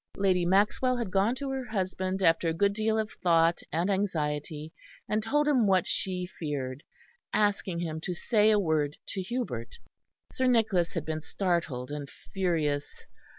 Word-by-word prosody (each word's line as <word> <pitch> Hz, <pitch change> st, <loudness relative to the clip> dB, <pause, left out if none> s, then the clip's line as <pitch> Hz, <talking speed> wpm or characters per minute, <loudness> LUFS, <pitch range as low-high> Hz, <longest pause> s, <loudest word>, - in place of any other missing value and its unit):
Lady 185 Hz, -3 st, +2 dB
Maxwell 210 Hz, +7 st, +3 dB
had 230 Hz, -6 st, -3 dB
gone 200 Hz, +6 st, +2 dB
to 275 Hz, 0 st, -4 dB
her 265 Hz, -1 st, -3 dB
husband 190 Hz, -3 st, -2 dB
after 165 Hz, 0 st, +4 dB
a 160 Hz, -, -1 dB
good 200 Hz, +3 st, +2 dB
deal 220 Hz, +1 st, 0 dB
of 220 Hz, 0 st, -1 dB
thought 165 Hz, -1 st, +4 dB
and 170 Hz, +3 st, 0 dB
anxiety, 155 Hz, -5 st, -2 dB, 0.3 s
and 215 Hz, +1 st, 0 dB
told 295 Hz, +7 st, +1 dB
him 255 Hz, -7 st, +4 dB
what 190 Hz, -2 st, +3 dB
she 180 Hz, -1 st, -2 dB
feared; 140 Hz, -4 st, -3 dB, 0.5 s
asking 205 Hz, -4 st, +1 dB
him 160 Hz, -2 st, -3 dB
to 180 Hz, +1 st, -3 dB
say 215 Hz, +3 st, +3 dB
a 215 Hz, -, +5 dB
word 155 Hz, -6 st, 0 dB
to 190 Hz, -, -4 dB
Hubert. 185 Hz, -, -4 dB, 0.6 s
Sir 260 Hz, -, +1 dB
Nicholas 220 Hz, -8 st, +2 dB
had -, -, -3 dB
been 155 Hz, 0 st, -3 dB
startled 160 Hz, -9 st, -2 dB
and 145 Hz, -1 st, -5 dB, 0.2 s
furious. 155 Hz, -7 st, -1 dB
185 Hz, 160 wpm, -29 LUFS, 160-215 Hz, 0.6 s, a